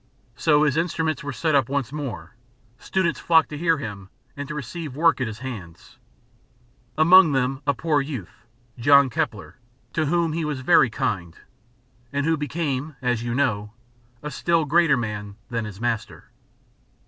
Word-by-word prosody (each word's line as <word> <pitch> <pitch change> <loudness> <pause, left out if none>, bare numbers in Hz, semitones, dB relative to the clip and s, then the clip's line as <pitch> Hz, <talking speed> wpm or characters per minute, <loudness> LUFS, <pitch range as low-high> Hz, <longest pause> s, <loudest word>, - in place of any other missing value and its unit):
So 150 +5 +3
his 150 -1 +1
instruments 165 -2 -1
were 145 - -4
set 155 +4 -1
up 135 -4 +3
once 140 -2 -2
more, 115 - -6 0.4
students 170 -7 -1
flocked 165 -1 +3
to 150 - -6
hear 165 -1 +2
him 100 -8 -7 0.3
and 140 0 -6
to 150 - -6
receive 150 0 -6
work 165 -2 +3
at 130 - 0
his 110 -1 -6
hands 110 -10 -9 1.0
among 165 0 +7
them 135 +1 0
a 140 - +2
poor 150 +1 +1
youth, 125 - -8 0.3
John 140 +1 +5
Kepler, 105 -2 -3 0.4
to 155 -2 0
whom 170 0 +1
he 165 0 -2
was 150 -3 -3
very 130 -1 +5
kind, 105 -9 -3 0.7
and 140 0 -1
who 165 0 +2
became, 150 -1 -3
as 125 -3 0
you 120 0 -3
know, 105 -6 0 0.5
a 150 - -5
still 165 +3 +1
greater 155 -2 +4
man 105 -3 -4 0.2
than 115 -2 -2
his 105 -2 -9
master. 115 -2 -3
140 Hz, 160 wpm, -23 LUFS, 120-155 Hz, 1.0 s, among